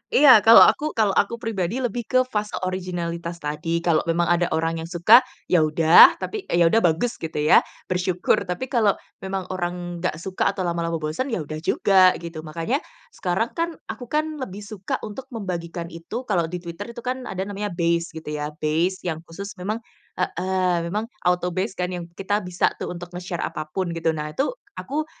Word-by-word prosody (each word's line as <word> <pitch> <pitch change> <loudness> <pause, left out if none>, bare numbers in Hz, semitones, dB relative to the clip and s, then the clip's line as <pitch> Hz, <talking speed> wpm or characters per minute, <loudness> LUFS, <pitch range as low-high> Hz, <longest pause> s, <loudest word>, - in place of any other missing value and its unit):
Iya, 270 -5 +9
kalau 225 +3 +9
aku 305 +1 +2
kalau 215 -3 +3
aku 200 +4 +1
pribadi 225 +1 -2
lebih 240 0 -2
ke 255 0 +3
fase 210 0 -2
originalitas 175 -2 -4
tadi, 165 +3 -2
kalau 170 -3 +3
memang 170 +1 +2
ada 175 0 +3
orang 165 0 -1
yang 165 - -6
suka, 175 +7 +7 0.3
ya 175 - +6
udah, 155 +2 +7
tapi 430 -2 -6
ya 170 0 +3
udah 225 - +5
bagus 185 +6 +1
gitu 160 - -6
ya, 150 +1 +6 0.3
bersyukur. 180 0 +1
Tapi 180 +9 -4
kalau 220 -5 +3 0.2
memang 190 0 -3
orang 175 -1 -4
nggak 180 -2 -1
suka 185 +4 -1
atau 185 - -2
lama-lama 170 -1 -1
bosen, 155 - -2
ya 225 - -2
udah 155 +1 -6
juga, 185 +3 +4
gitu. 165 -1 -6
Makanya, 165 - -2 0.3
sekarang 190 - -1
kan, 335 0 -2 0.2
aku 245 - -9
kan 305 +2 -1
lebih 205 -5 -6
suka 205 -2 -4
untuk 220 +5 -7
membagikan 175 - -5
itu, 170 +9 -6
kalau 180 -9 0
di 175 +1 -6
Twitter 170 +4 -7
itu 235 - -8
kan 255 0 -3
ada 190 0 -3
namanya 205 +1 -4
base 170 0 +1
gitu 160 -1 -6
ya 150 -1 -3 0.2
base 165 +5 0
yang 160 -3 -2
khusus 200 +4 -8
memang 215 +5 -3 0.3
heeh, 185 0 0
memang 210 +5 -2 0.2
autobase 180 +3 0
kan 180 0 -2
yang 175 -2 -5
kita 205 +3 0
bisa 180 -3 0
tuh - - -4
untuk 175 0 -9
nge-share 180 -1 -5
apa 155 -2 -4
pun, 185 -3 -1
gitu. 165 -1 -1
Nah 150 0 -4
itu, 275 - 0 0.2
aku, 300 +3 -3
180 Hz, 190 wpm, -23 LUFS, 170-210 Hz, 0.3 s, Iya